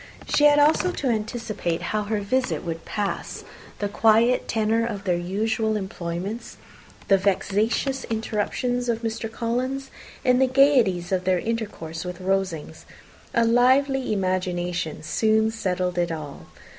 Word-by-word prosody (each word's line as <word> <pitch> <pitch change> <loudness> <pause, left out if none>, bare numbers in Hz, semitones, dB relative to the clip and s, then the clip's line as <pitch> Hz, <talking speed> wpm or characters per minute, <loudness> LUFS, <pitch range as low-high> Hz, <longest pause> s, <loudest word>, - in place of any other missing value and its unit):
She 295 - +5
had 295 0 +6
also 310 +5 +4
to 275 -6 -2
anticipate 215 -6 -2
how 210 -1 0
her 210 0 -1
visit 255 +6 -1
would 165 -1 -5
pass, 205 -2 -3 0.3
the 205 - -1
quiet 225 +4 +3
tenour 225 +1 +1
of 210 -4 -4
their 180 -3 +1
usual 215 +5 -1
employments, 190 +2 -5 0.5
the 195 -1 +5
vexatious 210 +7 0
interruptions 230 +3 -2
of 230 0 -1
Mr. 225 0 -3
Collins, 255 +4 -2 0.3
and 250 0 +4
the 265 - +5
gaieties 250 -10 +3
of 185 -1 0
their 185 -1 +3
intercourse 205 -6 -4
with 180 0 -6
Rosings. 185 -4 -2 0.5
A 235 - +4
lively 260 +3 +3
imagination 180 -4 -2
soon 220 +5 +2
settled 180 -5 -1
it 175 -1 0
all. 150 -3 -7
215 Hz, 135 wpm, -24 LUFS, 185-235 Hz, 0.5 s, had